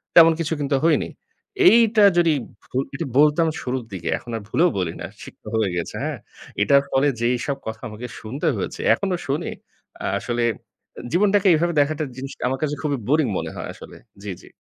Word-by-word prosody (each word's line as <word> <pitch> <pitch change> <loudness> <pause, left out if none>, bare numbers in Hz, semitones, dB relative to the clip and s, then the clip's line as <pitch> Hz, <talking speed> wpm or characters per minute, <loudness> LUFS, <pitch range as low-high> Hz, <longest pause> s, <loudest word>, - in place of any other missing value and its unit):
তেমন 165 -1 +9
কিছু 160 0 -1
কিন্তু 140 -1 0
হয়নি।" 165 -1 +2 0.6
এইটা 225 -2 +6
যদি 170 -2 +4 0.3
ভু 125 - -6 0.4
বলতাম 150 +2 +4
শুরুর 125 -1 -3
দিকে। 85 -2 -4
এখন 120 - -10
আর - - -7
ভুলেও 175 +7 +3
বলি 85 -3 -1
না। - - -4 0.2
শিক্ষা - - -11
হয়ে 110 -4 +2
গেছে, 85 - -4
হ্যাঁ? - - -3 0.4
এটার 140 -1 +5
ফলে 135 +2 +2
যেসব 125 +3 0
কথা 110 0 -5
আমাকে 110 +3 -7
শুনতে 125 +7 -4
হয়েছে, - - -4
এখনো 190 -2 -1
শুনি। 140 +3 -1 0.5
আ - - -2
আসলে 120 0 -2 0.7
জীবনটাকে 200 +2 +3
এভাবে 170 +2 +1
দেখাটা 155 +2 0
জিনিসটা 135 -1 -7
আমার 130 +1 -2
কাছে 150 -1 0
খুবই 145 -3 -1
বোরিং 150 -1 +3
মনে - - -4
হয় - - -5
আসলে। - - -12 0.3
জি, 100 - -4
জি। - - -16
145 Hz, 175 wpm, -22 LUFS, 125-165 Hz, 0.7 s, তেমন